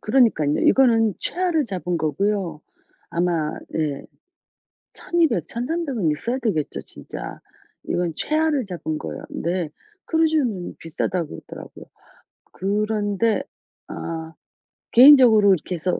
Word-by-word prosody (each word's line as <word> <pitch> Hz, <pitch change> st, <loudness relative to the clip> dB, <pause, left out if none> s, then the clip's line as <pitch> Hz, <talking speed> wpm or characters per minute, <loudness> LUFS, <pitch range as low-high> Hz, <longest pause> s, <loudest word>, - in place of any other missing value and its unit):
그러니깐요. 215 Hz, -, +2 dB
이거는 225 Hz, -5 st, +4 dB
최하로 350 Hz, -4 st, 0 dB
잡은 180 Hz, -5 st, -3 dB
거고요. 165 Hz, +1 st, -1 dB, 0.5 s
아마 170 Hz, -3 st, -1 dB
네. 150 Hz, -3 st, -2 dB, 0.9 s
1,200, 335 Hz, -8 st, 0 dB
1,300은 250 Hz, -, -1 dB
있어야 235 Hz, -, -2 dB
되겠죠 205 Hz, -, -2 dB
진짜. -, -, -9 dB, 0.4 s
이건 175 Hz, -2 st, -1 dB
최하를 310 Hz, -3 st, +1 dB
잡은 170 Hz, -5 st, -4 dB
거예요. 75 Hz, -2 st, -6 dB
근데 170 Hz, -1 st, -2 dB, 0.4 s
크루즈는 310 Hz, -, 0 dB
비싸다고 165 Hz, +1 st, -3 dB
그러더라고요. -, -, -10 dB, 0.7 s
그런데 210 Hz, +2 st, 0 dB, 0.4 s
아 160 Hz, -1 st, -6 dB, 0.6 s
개인적으로 240 Hz, -6 st, +8 dB
이렇게 180 Hz, +1 st, -3 dB
해서 175 Hz, +2 st, -1 dB
205 Hz, 255 characters per minute, -22 LUFS, 165-255 Hz, 0.9 s, 개인적으로